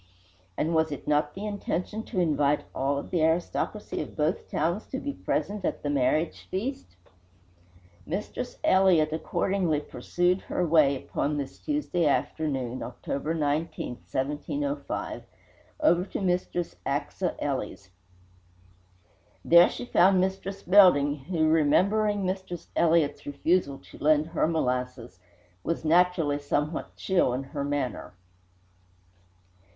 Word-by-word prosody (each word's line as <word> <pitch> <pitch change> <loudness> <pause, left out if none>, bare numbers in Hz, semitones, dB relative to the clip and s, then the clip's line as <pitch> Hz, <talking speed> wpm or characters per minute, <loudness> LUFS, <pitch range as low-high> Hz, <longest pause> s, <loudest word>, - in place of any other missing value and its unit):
And 165 +2 0
was 160 -1 +2
it 145 - -7
not 150 0 +1
the 200 +2 -5
intention 205 0 -3
to 195 - -3
invite 150 -4 +2
all 140 +1 0
of - - -6
the 175 - +1
aristocracy 170 +6 -1
of - - -8
both 155 +3 -1
towns 170 +7 -1
to 265 - -4
be 285 +1 -4
present 205 -6 -2
at - - -2
the 145 - -1
marriage 145 +4 0
feast? 200 - -4 1.1
Mistress 210 +8 -4
Elliott 180 -5 +4
accordingly 170 0 0
pursued 175 +7 -1
her 180 - -2
way 155 -4 +4
upon 145 +2 -2
this 140 -2 -5
Tuesday 290 - 0
afternoon, 135 -4 -1
October 140 +5 -4
19, 150 +1 -1 0.2
1705, 215 - -3 0.6
over 180 - +4
to - - -5
Mistress 180 - -1
Achsah - - -2
Ely's. 95 -1 -4 1.5
There 170 +1 +7
she - - -6
found 190 -4 +4
Mistress 190 +1 -2
Belding, 145 -8 +5
who, 165 -3 +1
remembering 195 +7 +3
Mistress 185 -2 -4
Elliott's 160 -3 +2
refusal 145 0 +1
to - - -13
lend 150 0 +3
her 165 -1 +1
molasses, 125 - -2 0.4
was 165 -1 -2
naturally 165 -3 +3
somewhat 145 +2 -2
chill 180 -10 +1
in 135 - -3
her 140 +1 -5
manner. 140 -9 -3
160 Hz, 125 wpm, -27 LUFS, 145-185 Hz, 1.5 s, There